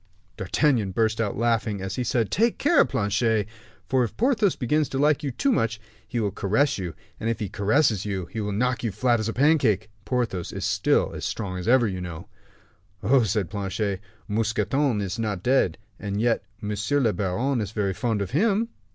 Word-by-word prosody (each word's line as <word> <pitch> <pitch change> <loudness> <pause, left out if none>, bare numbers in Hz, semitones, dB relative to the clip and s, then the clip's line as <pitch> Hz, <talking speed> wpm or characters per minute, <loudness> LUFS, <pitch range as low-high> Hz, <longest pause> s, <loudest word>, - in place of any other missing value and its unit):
D'Artagnan 105 0 +1
burst 110 +2 +1
out 105 -3 -2
laughing, 115 -2 +1
as 95 +1 -4
he 125 - -1
said, 120 -2 0
"Take 230 +2 +2
care, 300 +2 +5
Planchet; 105 -2 +1 0.4
for 130 -1 +2
if 115 - -5
Porthos 220 -6 +2
begins 145 +3 0
to 135 - -3
like 150 +1 +3
you 145 -3 -2
so 280 - +2
much, 115 - 0 0.3
he 120 - -2
will 105 -3 0
caress 105 +7 +1
you, 90 -4 -5 0.2
and 115 - -1
if 115 - -1
he 105 - -2
caresses 105 +2 +2
you 95 -3 -3
he 110 +5 -5
will 105 0 -2
knock 125 +5 0
you 115 - +1
as 95 - -9
flat 120 +1 +2
as 110 +1 -1
a - - -2
pancake. 125 - +2
Porthos 115 -9 -2
is - - -4
still - - +2
as - - -6
strong 95 -4 -3
as 90 - -6
ever, 120 -1 +5
you 95 -2 -4
know." 85 -2 -7 0.8
"Oh," 130 +6 +4
said 105 -4 -1
Planchet, 100 -1 -2 0.3
"Mousqueton 115 +3 0
is 100 +1 -3
not 105 -5 -2
dead, 125 -10 +2 0.2
and 100 0 -3
yet 115 -2 +1 0.2
monsieur 105 +7 0
le 115 -6 +2
baron 110 +8 0
is 105 - -3
very 100 -3 -1
fond 110 0 -1
of 100 - -7
him." 215 - +2
110 Hz, 200 wpm, -25 LUFS, 100-130 Hz, 0.8 s, care